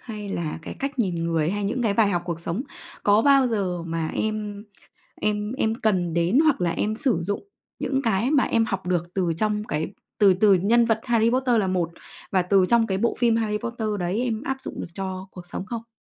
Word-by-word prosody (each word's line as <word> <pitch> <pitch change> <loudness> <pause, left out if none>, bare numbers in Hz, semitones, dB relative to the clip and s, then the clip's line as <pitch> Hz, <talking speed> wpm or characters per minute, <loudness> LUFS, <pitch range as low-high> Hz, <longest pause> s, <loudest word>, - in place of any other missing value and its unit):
hay 210 -4 -7
là 165 -5 -3
cái - - -7
cách 275 0 -4
nhìn 175 -7 0
người 165 -1 +1
hay 205 +1 -2
những 235 +5 -1
cái 215 -4 +1
bài 215 -1 +4
học 175 -3 0
cuộc 170 -2 -4
sống. 170 +9 -3 0.4
Có 205 +2 +4
bao 275 -1 +5
giờ 190 -7 -1
mà 165 -1 -2
em 210 -1 -3 0.6
em 210 0 0
em 225 -4 0
cần 185 -7 0
đến 170 - +3
hoặc 310 - +3
là 170 -1 +1
em 215 +5 -1
sử 240 - +1
dụng 205 - -3 0.4
những 270 -1 0
cái 225 +2 +1
mà 285 -3 +4
em 225 -1 +2
học 195 -4 -3
được 175 -2 +1
từ 180 -4 0
trong 210 -1 0
cái 160 0 -3 0.2
từ 195 -3 +6
từ 200 +2 +5
nhân 225 +6 +4
vật 225 -1 +1
Harry 230 -2 +3
Potter 250 -1 +2
là 195 - 0
một 180 -3 0 0.4
và 190 - +3
từ 185 +1 +3
trong 235 -1 +4
cái 190 - 0
bộ 235 +4 +1
phim 235 -2 +3
Harry 215 -2 0
Potter 230 0 -4
đấy 185 +7 -1
em 230 -3 -2
áp 270 0 -2
dụng - - -6
được - - -5
cho 190 -1 -4
cuộc 180 -1 -10
sống 185 - -5
không? 230 0 -6
210 Hz, 230 wpm, -24 LUFS, 185-230 Hz, 0.6 s, từ